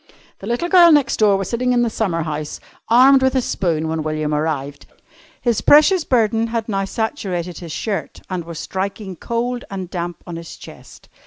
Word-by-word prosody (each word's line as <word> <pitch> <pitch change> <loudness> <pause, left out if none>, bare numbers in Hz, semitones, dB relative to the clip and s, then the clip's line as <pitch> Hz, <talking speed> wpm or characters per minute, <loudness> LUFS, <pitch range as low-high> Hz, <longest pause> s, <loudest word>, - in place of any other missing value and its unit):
The 195 - -8
little 240 +9 -1
girl 350 -2 +7
next 290 -3 +3
door 205 -2 +4
was 195 - -3
sitting 250 +1 0
in 240 -1 +3
the 235 - +1
summer 180 -7 -1
house, 150 -1 -5 0.3
armed 260 +3 +6
with 265 0 +2
a - - +4
spoon, 165 -8 -1
when 160 0 -2
William 155 0 -2
arrived. 145 -2 -3 0.5
His 235 -3 0
precious 310 +4 +5
burden 225 -2 +1
had 230 -1 -3
now 195 -3 -1
saturated 190 - -3
his 170 -3 -8
shirt 200 +5 -4
and 185 -2 -4
was 165 -1 -9
striking 190 +2 -4
cold 240 +5 -3
and 190 -3 -6
damp 175 -1 -5
on 175 -2 -7
his 165 -1 -9
chest. - - -14
195 Hz, 185 wpm, -19 LUFS, 170-240 Hz, 0.5 s, girl